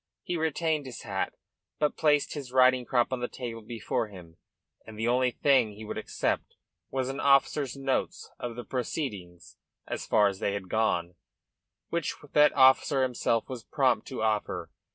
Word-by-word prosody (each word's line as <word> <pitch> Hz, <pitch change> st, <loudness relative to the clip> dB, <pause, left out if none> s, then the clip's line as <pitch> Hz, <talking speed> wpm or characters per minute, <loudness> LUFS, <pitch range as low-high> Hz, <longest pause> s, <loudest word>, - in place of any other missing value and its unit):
He 175 Hz, -, -2 dB
retained 160 Hz, -2 st, 0 dB
his 125 Hz, -, -8 dB
hat, -, -, -2 dB, 0.4 s
but 150 Hz, -1 st, +1 dB
placed 150 Hz, -2 st, +2 dB
his 140 Hz, -4 st, -6 dB
riding 130 Hz, -1 st, +5 dB
crop 120 Hz, +1 st, +1 dB
on 130 Hz, -, -1 dB
the 125 Hz, -, -2 dB
table 120 Hz, -3 st, -6 dB
before 115 Hz, 0 st, -3 dB
him; 90 Hz, -5 st, -13 dB, 0.5 s
and 110 Hz, -1 st, -11 dB
the 115 Hz, +2 st, -1 dB
only 125 Hz, +1 st, +3 dB
thing 125 Hz, -4 st, +2 dB
he 110 Hz, +2 st, -10 dB
would -, -, -4 dB
accept -, -, -2 dB, 0.3 s
was 130 Hz, -1 st, -1 dB
an 135 Hz, +1 st, -4 dB
officer's 140 Hz, -1 st, +3 dB
notes 135 Hz, -1 st, -2 dB
of 120 Hz, -1 st, -5 dB
the 120 Hz, -, -6 dB
proceedings 105 Hz, -, -5 dB, 0.3 s
as -, -, -5 dB
far 105 Hz, -, +5 dB
as 95 Hz, -1 st, -3 dB
they 100 Hz, -, 0 dB
had 100 Hz, -2 st, -5 dB
gone, 90 Hz, -6 st, 0 dB, 0.8 s
which 170 Hz, -2 st, -2 dB, 0.2 s
that 150 Hz, 0 st, +6 dB
officer 130 Hz, 0 st, +5 dB
himself 120 Hz, -2 st, 0 dB
was 125 Hz, -3 st, -7 dB
prompt 130 Hz, -7 st, +1 dB
to 130 Hz, -4 st, -4 dB
offer. 110 Hz, -1 st, -1 dB
125 Hz, 170 wpm, -28 LUFS, 110-135 Hz, 0.8 s, that